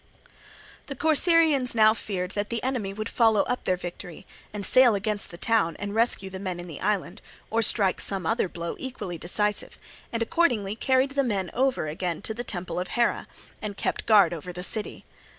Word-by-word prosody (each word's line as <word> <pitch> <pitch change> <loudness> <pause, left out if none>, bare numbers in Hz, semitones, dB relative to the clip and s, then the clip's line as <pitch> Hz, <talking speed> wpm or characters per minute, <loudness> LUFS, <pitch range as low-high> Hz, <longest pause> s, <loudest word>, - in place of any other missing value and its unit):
The 275 - -6
Corcyraeans 310 -3 +3
now 215 -1 +6
feared 190 -4 -4
that 205 0 -3
the 230 -1 -3
enemy 250 -7 -2
would 215 +2 -5
follow 225 -4 +3
up 250 - -3
their 185 - +1
victory 175 -1 -8 0.3
and 205 -2 -5
sail 255 -1 +5
against 205 0 -2
the 170 - -10
town 175 -6 +1
and 205 0 -5
rescue 220 -4 +1
the 190 - -6
men 185 -2 -4
in 175 - -6
the 160 - -8
island, 200 -3 -1 0.3
or 225 +1 +2
strike 200 -3 +3
some 195 -3 0
other 225 -1 +1
blow 170 0 -5
equally 205 -10 -6
decisive, 210 +5 -1 0.3
and 230 0 0
accordingly 225 -9 +1
carried 260 +3 +2
the 275 0 +1
men 195 -7 -1
over 260 -9 +1
again 170 +2 -3
to 220 - -3
the 240 +2 -5
temple 180 -5 -3
of 180 - -3
Hera, 235 -1 +1 0.3
and 205 -2 -5
kept - - -2
guard 200 -6 +6
over 170 +2 -6
the 180 0 -6
city. 215 +3 -1
210 Hz, 190 wpm, -26 LUFS, 185-235 Hz, 0.3 s, now